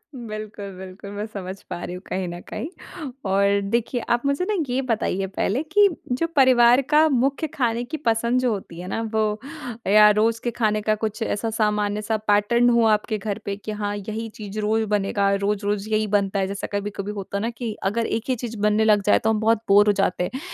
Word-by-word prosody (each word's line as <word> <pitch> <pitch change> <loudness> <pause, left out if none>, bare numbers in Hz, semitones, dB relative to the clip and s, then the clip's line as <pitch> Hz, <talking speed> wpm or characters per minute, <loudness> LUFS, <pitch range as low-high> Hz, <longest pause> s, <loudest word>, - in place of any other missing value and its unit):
बिल्कुल, 215 -4 -7
बिल्कुल 190 +1 -9
मैं 205 +1 -4
समझ 190 -3 -6 0.2
पा 175 - -5
रही 180 - -5
हूँ 180 - -8
कहीं 185 0 -2
न 175 0 -6
कहीं 305 - -7 0.2
और 200 +1 +3
देखिए 235 +2 0
आप 240 0 +2
मुझे 280 +5 +1
न 390 -6 +1
ये 255 +2 0
बताइए 195 -3 0
पहले 245 +9 0
कि 400 +6 +4 0.3
जो 330 - +2
परिवार 250 -1 +6
का 310 +1 +6
मुख्य 275 +3 +1
खाने 240 -2 0
की 315 +6 -5
पसंद 235 +2 +2
जो 250 - +1
होती 175 -4 -6
है 180 - -7
न - - -1
वो 220 - +3 0.7
या 210 0 +8
रोज़ 225 +1 +2
के 240 - +1
खाने 215 -2 +2
का 215 - +5
कुछ 215 +2 -3
ऐसा 225 +1 -1
सामान्य-सा 210 0 0
पैटर्न 220 +4 +4
हुआ 230 -2 +4
आपके 210 +1 0
घर 205 0 -3
पे 200 -1 -3
कि 215 +1 -6
हाँ 205 0 -1
यही 220 +3 -5
चीज़ 210 -2 -7
रोज़ 220 +1 +1
बनेगा, 200 -1 +1
रोज़-रोज़ 205 +1 -1
यही 215 0 +1
बनता 200 0 0
है 190 - +1
जैसा 200 0 -4
कभी-कभी 205 0 -3
होता 200 +1 -4
है 220 - -2
न - - -1
कि 235 -3 -3 0.2
अगर 230 +1 -1
एक 225 - -1
ही - - +3
चीज़ 230 -1 -6
बनने 210 +1 +3
लग 210 -2 +4
जाए - - +5
तो 220 - +3
हम 215 -1 +1
बहुत 225 0 +3
बोर 205 +1 +6
हो 205 - +5
जाते 180 -1 0
हैं। 265 - -4
215 Hz, 215 wpm, -23 LUFS, 205-235 Hz, 0.7 s, या